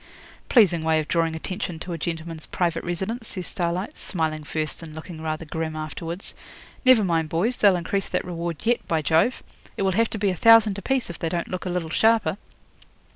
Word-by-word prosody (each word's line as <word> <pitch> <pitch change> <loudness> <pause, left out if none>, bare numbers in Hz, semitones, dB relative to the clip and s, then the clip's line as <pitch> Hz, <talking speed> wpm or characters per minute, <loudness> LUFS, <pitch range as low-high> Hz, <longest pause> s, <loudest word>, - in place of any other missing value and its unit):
'Pleasing 190 - +5
way 160 0 +3
of 155 - -3
drawing 165 -1 +1
attention 180 +1 -4
to 175 +2 -6
a - - -3
gentleman's 165 0 -4
private 170 -2 -1
residence,' 190 +7 -3
says 185 -2 -5
Starlight, 175 +3 -2
smiling 155 -4 -2
first 155 +2 -3
and 160 -2 -9
looking 160 0 -8
rather 155 +1 -3
grim 160 0 -3
afterwards. 165 +4 -5 0.5
'Never 255 -5 +6
mind, 165 -4 +1
boys, 210 +11 0
they'll 200 -3 +5
increase 185 +3 -1
that - - -1
reward 170 -2 -3
yet, 235 +2 +2
by 160 -2 0
Jove! 160 - +2 0.3
It - - 0
will 190 - +2
have 225 +4 +2
to - - -4
be 200 -2 +1
a - - -3
thousand 225 0 +6
a - - -9
piece 265 -4 0
if 170 - -11
they 165 - -1
don't 170 0 -2
look 185 0 -4
a - - -1
little 175 -3 -2
sharper.' 220 -2 +3
170 Hz, 205 wpm, -24 LUFS, 160-200 Hz, 0.5 s, Never